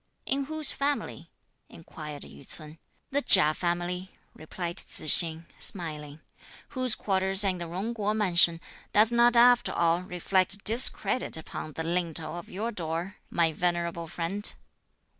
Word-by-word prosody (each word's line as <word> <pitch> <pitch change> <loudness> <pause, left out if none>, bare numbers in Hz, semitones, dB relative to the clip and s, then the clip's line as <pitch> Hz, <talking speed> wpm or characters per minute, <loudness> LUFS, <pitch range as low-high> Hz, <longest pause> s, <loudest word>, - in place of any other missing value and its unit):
"In 275 0 -2
whose 310 0 +1
family?" 285 +1 -4 0.4
inquired 150 -3 -10
Yü - - -14
ts'un. 155 +3 -11 0.3
"The 285 +1 0
Chia 165 - +7
family," 175 +2 -3 0.2
replied 170 +2 -7
Tzu - - +1
hsing 165 +1 +4
smiling, 155 -4 -1 0.5
"whose 255 -3 -1
quarters 190 0 0
are - - +2
in 185 -1 -4
the 170 - -6
Jung 195 +7 -5
Kuo 210 -1 -2
Mansion, 175 -5 +5 0.3
does 215 +2 +4
not 240 0 +3
after 245 +1 +4
all 170 +1 +1
reflect 185 +2 -1
discredit 240 -1 +1
upon 155 -1 -9
the 160 - -5
lintel 165 -2 -3
of 175 - -9
your 215 +5 -5
door, 170 +1 -5
my 165 -2 0
venerable 170 0 -3
friend." 175 +5 -5
180 Hz, 140 wpm, -27 LUFS, 165-210 Hz, 0.5 s, Chia